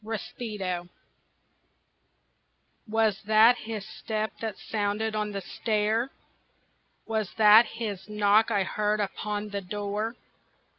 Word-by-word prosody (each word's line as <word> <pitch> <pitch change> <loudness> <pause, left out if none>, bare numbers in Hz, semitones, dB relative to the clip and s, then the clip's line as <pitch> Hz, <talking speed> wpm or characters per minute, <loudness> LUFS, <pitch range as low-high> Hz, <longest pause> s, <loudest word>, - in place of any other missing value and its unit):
Rispetto 205 -5 -4 2.0
Was 220 -2 +1
that 220 +3 +7
his 220 -3 -5
step 215 -1 -3
that 220 -3 -4
sounded 215 +1 -2
on 210 0 -1
the 200 -1 -4
stair? 220 +5 0 1.0
Was 220 -3 -1
that 215 +1 +8
his 210 -4 -5
knock 210 +1 +3
I 205 -3 +2
heard 210 +2 0
upon 210 +1 -3
the 200 -1 -3
door? 205 +4 -3
210 Hz, 105 wpm, -27 LUFS, 205-220 Hz, 2.0 s, that